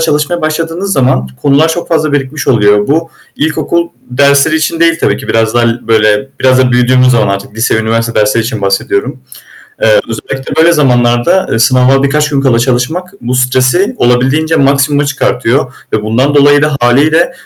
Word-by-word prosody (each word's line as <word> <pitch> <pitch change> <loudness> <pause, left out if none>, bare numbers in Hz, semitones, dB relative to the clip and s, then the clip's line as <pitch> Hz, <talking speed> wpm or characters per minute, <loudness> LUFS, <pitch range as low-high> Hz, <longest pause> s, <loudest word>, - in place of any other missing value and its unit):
çalışmaya 160 +2 -1
başladığınız 165 +5 -3
zaman 125 - 0
konular 145 +3 +2
çok 170 +2 -4
fazla 155 -3 0
birikmiş 140 0 -3
oluyor. 105 -4 +2
Bu 165 +3 -1 0.3
ilkokul 170 +2 -1 0.2
dersleri 140 +4 +2
için 160 +1 -2
değil 165 0 +3
tabii - - +1
ki. - - -10
Biraz 115 0 0
daha 120 - +2
l 115 +1 -1
böyle, 110 +3 +1
biraz 130 0 +3
da 125 -1 +2
büyüdüğümüz 125 +1 +2
zaman 110 -4 +1
artık, 100 +2 -9
lise 110 0 0
ve - - 0
üniversite 115 0 -1
dersleri 105 +2 +1
için 110 -4 -5
bahsediyorum. 100 - -2 0.6
Eee, - - +4
özellikle 135 +2 -6
böyle 165 +2 +4
zamanlarda, 125 +3 +1
eee, 115 - 0
sınava 130 +3 +2
birkaç 150 +2 0
gün 140 -1 0
kala 130 -4 +1
çalışmak 130 +9 -2
bu 125 +2 -3
stresi 130 - +1
olabildiğince 130 +6 +1
maksimuma 140 +1 +1
çıkartıyor 130 -1 -1 0.2
ve 110 - -1
bundan 125 +7 0
dolayı 145 0 +4
da 150 -2 0
hâliyle, 155 - +2
135 Hz, 170 wpm, -10 LUFS, 120-155 Hz, 0.6 s, Eee